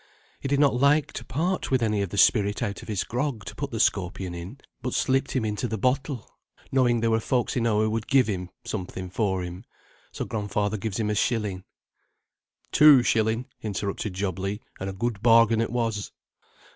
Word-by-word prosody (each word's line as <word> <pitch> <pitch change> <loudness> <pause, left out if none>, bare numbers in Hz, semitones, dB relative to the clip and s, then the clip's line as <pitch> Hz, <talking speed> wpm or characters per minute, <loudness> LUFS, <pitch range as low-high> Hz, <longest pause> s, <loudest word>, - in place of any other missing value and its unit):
He - - -4
did 140 +1 +1
not 145 -2 +4
like 140 +4 +3
to - - -6
part 175 +8 -1
with 130 -3 +2
any 105 -2 +1
of 100 - -2
the 100 - -6
spirit 105 +2 +3
out 100 -4 -3
of - - -12
his 105 -4 -1
grog 125 -4 -3
to - - -7
put - - -4
the - - -4
scorpion 90 -1 0
in, 85 +9 -7 0.2
but 125 - -3
slipped 135 +1 +1
him 130 -4 0
into 105 +3 -2
the 110 -1 -3
bottle, 130 +3 -1 0.4
knowing 120 -3 +3
there 115 0 +2
were 110 - +3
folks 120 +1 0
enow 115 -3 +2
who 110 - +2
would 110 0 -2
give 135 -2 +4
him 90 -4 -3 0.2
something 95 -2 -5
for 95 -3 0
him. 90 +1 -7 0.5
So - - -4
grandfather 105 -1 -2
gives 105 +1 -3
him 105 -1 0
a - - +1
shilling." 105 -4 -1 1.1
"Two 150 -4 +7
shilling," 115 +1 +1 0.2
interrupted 100 -1 -3
Job 95 -2 -2
Legh, 100 +3 -3 0.2
"and 95 - -3
a - - -5
good 110 +1 -2
bargain 115 -1 +5
it 115 - -1
was." 115 -3 -2
110 Hz, 195 wpm, -26 LUFS, 100-125 Hz, 1.1 s, Two